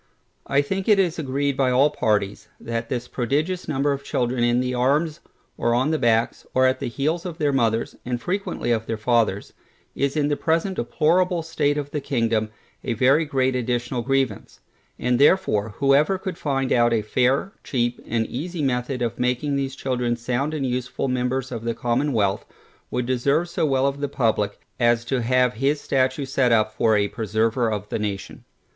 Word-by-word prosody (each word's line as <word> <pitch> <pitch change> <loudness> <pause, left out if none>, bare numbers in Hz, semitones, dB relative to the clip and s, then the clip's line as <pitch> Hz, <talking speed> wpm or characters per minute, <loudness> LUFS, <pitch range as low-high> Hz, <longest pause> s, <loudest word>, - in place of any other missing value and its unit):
I 140 +1 +2
think 195 +7 -3
it 210 - +6
is 180 -3 +1
agreed 140 -1 -1
by 135 -1 +2
all 135 +4 +4
parties, 105 -7 -1
that 115 0 -4
this 125 -1 -3
prodigious 150 +10 -1
number 145 0 +1
of 140 0 -3
children 125 -2 -1
in 120 +1 +3
the 125 0 -1
arms, 145 +6 +1 0.4
or 120 0 +2
on 130 +5 +1
the 155 - 0
backs, 115 -1 +1
or 130 0 +4
at 130 0 +2
the - - -3
heels 155 +8 -1
of 175 -3 -6
their 145 -2 +1
mothers, 115 -3 0
and 125 -1 -3
frequently 185 -6 -2
of 110 -1 0
their 115 - -2
fathers, 110 -3 0 0.4
is 140 +2 -1
in 145 -1 +2
the 145 - +1
present 165 +5 0
deplorable 170 +7 +1
state 150 -3 0
of 145 -1 -4
the 150 - -2
kingdom, 115 -5 0 0.3
a 120 - -1
very 135 +7 +3
great 130 -3 0
additional 120 0 -1
grievance; 135 -3 -1 0.4
and 125 0 0
therefore 125 - +3
whoever 140 +7 +3
could 190 -1 -5
find 135 -4 -1
out 120 -1 +3
a 110 -2 +1
fair, 130 - +1
cheap 120 -2 -1
and 115 0 0
easy 160 +7 -4
method 125 -1 -1
of 115 - -3
making 125 +4 0
these 135 -1 -2
children 125 -3 -1
sound 125 +6 -2
and 140 -3 -2
useful 125 +1 -2
members 125 +1 -1
of 115 -2 -5
the 115 0 -2
commonwealth, 120 -5 0 0.5
would 125 - -2
deserve 140 +7 +1
so 170 -2 0
well 135 -1 +2
of 140 0 -1
the 145 0 -2
publick, 110 -6 0 0.2
as 120 -1 +3
to 130 0 -1
have 125 +1 +2
his 135 +5 0
statue 130 0 0
set 130 -2 +1
up 110 -1 +3
for 110 -1 +3
a 100 0 +2
preserver 110 +2 0
of 105 -1 -3
the - - -2
nation. 100 -2 -5
130 Hz, 190 wpm, -23 LUFS, 120-145 Hz, 0.5 s, it